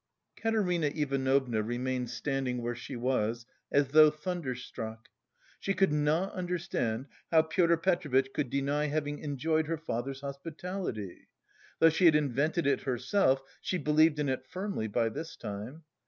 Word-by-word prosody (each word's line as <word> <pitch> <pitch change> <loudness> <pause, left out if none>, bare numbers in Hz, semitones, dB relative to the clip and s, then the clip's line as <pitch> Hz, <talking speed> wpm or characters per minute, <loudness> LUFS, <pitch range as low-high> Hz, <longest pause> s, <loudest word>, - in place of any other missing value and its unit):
Katerina 190 -8 +1
Ivanovna 135 -5 +1
remained 125 +2 -2
standing 125 0 -2
where 120 0 -2
she 120 +3 -7
was, 120 -2 0 0.3
as 140 -1 +3
though 155 +1 +8
thunderstruck. 130 -9 -5 0.5
She 195 - -1
could 190 -4 +3
not 150 +5 +1
understand 170 -10 -2 0.2
how 160 -1 +5
Pyotr 170 +1 +3
Petrovitch 155 -7 +1
could 140 -4 -1
deny 140 +3 0
having 145 0 -2
enjoyed 155 +2 0
her 165 0 -1
father's 135 -3 -4
hospitality. 140 - -5 0.5
Though 165 - +7
she 160 +3 +2
had 160 -3 +7
invented 150 +4 +1
it 140 - +2
herself, 135 +2 +1 0.2
she 185 - -1
believed 155 -1 +4
in 150 -1 0
it 130 -1 -2
firmly 190 - -3
by 115 +2 +1
this 165 +8 -6
time. 110 +6 -7
145 Hz, 140 wpm, -30 LUFS, 125-165 Hz, 0.5 s, though